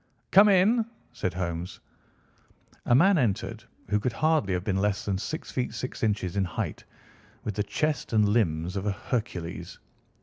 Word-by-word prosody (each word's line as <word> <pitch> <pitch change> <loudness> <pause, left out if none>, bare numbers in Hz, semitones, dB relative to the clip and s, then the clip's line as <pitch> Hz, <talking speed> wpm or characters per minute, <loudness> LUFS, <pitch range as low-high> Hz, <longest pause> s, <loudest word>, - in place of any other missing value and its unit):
"Come 205 +2 +8
in!" 205 +5 +4 0.3
said 95 -6 -2
Holmes. 85 -1 -4 1.1
A 120 - +5
man 185 +5 +5
entered 110 -8 -1 0.3
who 105 0 +2
could 115 +3 -1
hardly 155 -7 +2
have 90 -1 -1
been 95 -1 0
less 105 0 0
than 95 -2 -1
six 155 - -5
feet 125 -1 -2
six 130 - -5
inches 105 -4 0
in 100 - +3
height, 85 -4 -4 0.6
with 105 - -3
the 105 - -1
chest 150 +7 -1
and 105 -2 +4
limbs 90 -5 +1
of 100 +1 -2
a - - +2
Hercules. 100 -6 -4
105 Hz, 165 wpm, -27 LUFS, 95-130 Hz, 1.1 s, Come